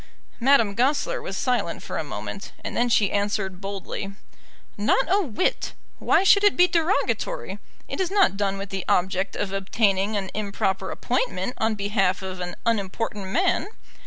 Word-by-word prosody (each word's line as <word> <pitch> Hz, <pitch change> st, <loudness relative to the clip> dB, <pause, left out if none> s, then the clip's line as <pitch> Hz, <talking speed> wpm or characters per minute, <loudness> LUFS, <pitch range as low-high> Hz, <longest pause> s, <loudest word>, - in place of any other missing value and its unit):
Madame 235 Hz, -5 st, +4 dB
Goesler 265 Hz, +7 st, +1 dB
was 195 Hz, -, -5 dB
silent 235 Hz, -9 st, -1 dB
for -, -, -4 dB
a -, -, -1 dB
moment, 105 Hz, -, -6 dB
and -, -, -5 dB
then 240 Hz, +1 st, +2 dB
she 210 Hz, -4 st, +3 dB
answered 200 Hz, -2 st, -1 dB
boldly, 195 Hz, 0 st, -5 dB, 0.6 s
"Not 215 Hz, +6 st, +2 dB
a 395 Hz, +3 st, +3 dB
whit. 300 Hz, -, -1 dB, 0.3 s
Why -, -, +3 dB
should 400 Hz, +1 st, +6 dB
it 410 Hz, -, +4 dB
be 360 Hz, 0 st, +7 dB
derogatory? 360 Hz, +8 st, 0 dB, 0.3 s
It -, -, -5 dB
is 365 Hz, -, 0 dB
not 390 Hz, -, +3 dB
done 195 Hz, -1 st, -1 dB
with 195 Hz, 0 st, -6 dB
the 190 Hz, -2 st, -3 dB
object 190 Hz, +2 st, +1 dB
of 200 Hz, -1 st, -2 dB
obtaining 195 Hz, +1 st, +1 dB
an 190 Hz, -2 st, -3 dB
improper 200 Hz, -2 st, -1 dB
appointment -, -, -1 dB
on 220 Hz, 0 st, +1 dB
behalf 200 Hz, -2 st, 0 dB
of 185 Hz, -1 st, -5 dB
an 180 Hz, 0 st, -4 dB
unimportant 210 Hz, -2 st, -1 dB
man. 355 Hz, -, +1 dB
205 Hz, 160 wpm, -24 LUFS, 195-250 Hz, 0.6 s, be